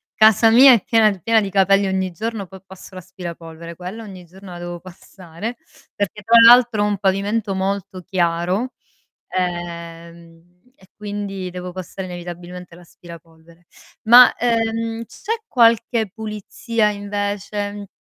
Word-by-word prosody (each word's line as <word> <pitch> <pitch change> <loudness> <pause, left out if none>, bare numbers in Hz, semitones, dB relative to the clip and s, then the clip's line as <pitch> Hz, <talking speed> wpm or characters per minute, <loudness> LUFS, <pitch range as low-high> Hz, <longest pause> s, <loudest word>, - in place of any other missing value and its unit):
Casa 220 +1 +5
mia 260 +2 +8
è 225 - +2
piena 225 -2 +3
d 190 -4 -9
piena 225 +2 +3
di 200 - -3
capelli 195 0 +3
ogni 190 -1 -2
giorno, 215 +2 -5
poi, 190 +1 -13
passo 190 0 -14
l'aspirapolvere, 170 -2 -9
quella 190 +6 -8
ogni 185 -4 -11
giorno 185 +2 -14
la 175 - -9
devo 175 -1 -7
passare, 185 +3 -9 0.4
perché 205 +1 -3
tra 230 +4 +2
l'altro 240 -3 +6
ho - - +2
un 205 - -1
pavimento 200 +2 -1
molto 190 0 -3
chiaro, 180 +7 -1 0.6
ehm, 170 -1 -6 0.2
e, 190 0 -22
quindi 205 -2 -6
devo 180 0 -7
passare 185 +1 -7
inevitabilmente 175 0 -9
l'aspirapolvere. 170 -1 -16 0.4
Ma, 240 +3 +7
ehm, 230 -1 -1
c'è 430 - -6 0.2
qualche 230 -3 +2
pulizia 220 0 -2
invece 205 0 -4
195 Hz, 135 wpm, -20 LUFS, 175-215 Hz, 0.6 s, mia